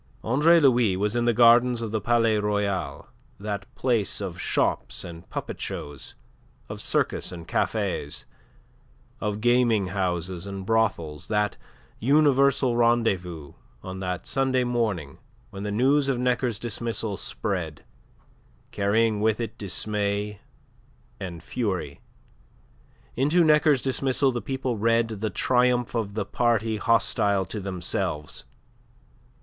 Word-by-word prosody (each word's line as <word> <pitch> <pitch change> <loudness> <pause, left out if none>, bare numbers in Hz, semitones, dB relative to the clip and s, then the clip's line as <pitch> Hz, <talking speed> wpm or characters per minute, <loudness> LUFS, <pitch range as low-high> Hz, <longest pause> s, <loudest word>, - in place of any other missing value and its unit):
Andre 150 +9 +5
Louis 120 - +4
was 105 +3 0
in 120 0 +1
the 120 - +4
gardens 120 +1 +5
of 110 - -4
the 110 -1 -1
Palais 115 -2 +2
Royal, 100 -8 -1 0.3
that 100 -1 -4
place 120 -6 0
of 95 -3 -5
shops - - -1
and 85 -1 -10
puppet - - -5
shows, 75 -2 -6 0.5
of - - -5
circus - - 0
and 85 -2 -9
cafes, 75 - -1 0.9
of 105 0 -3
gaming 120 -5 +3
houses 90 -1 -2
and 100 -1 -6
brothels, 100 -9 0
that 105 -2 0 0.4
universal 140 -1 +3
rendezvous, 95 -10 +1 0.3
on 95 0 -6
that 90 -1 -3
Sunday 130 -2 +1
morning 110 - -2 0.3
when 100 -1 -7
the 105 - -3
news 135 +6 +3
of 130 - +1
Necker's 125 -2 0
dismissal 115 -2 -3
spread, 90 -8 -4 0.9
carrying 105 +2 +1
with 110 0 +2
it 115 - -4
dismay 105 0 -2 0.8
and 85 -4 -7
fury. 105 -7 -3 1.1
Into 150 +8 +3
Necker's 150 -3 +4
dismissal 135 0 +1
the 120 -1 -3
people 130 -3 -3
read 115 +1 +2
the 110 0 -3
triumph 125 +2 +1
of 105 -4 -2
the 110 - -1
party 115 0 +1
hostile 105 -3 +2
to 105 - -5
themselves. 90 -5 -3
110 Hz, 120 wpm, -25 LUFS, 95-120 Hz, 1.1 s, Andre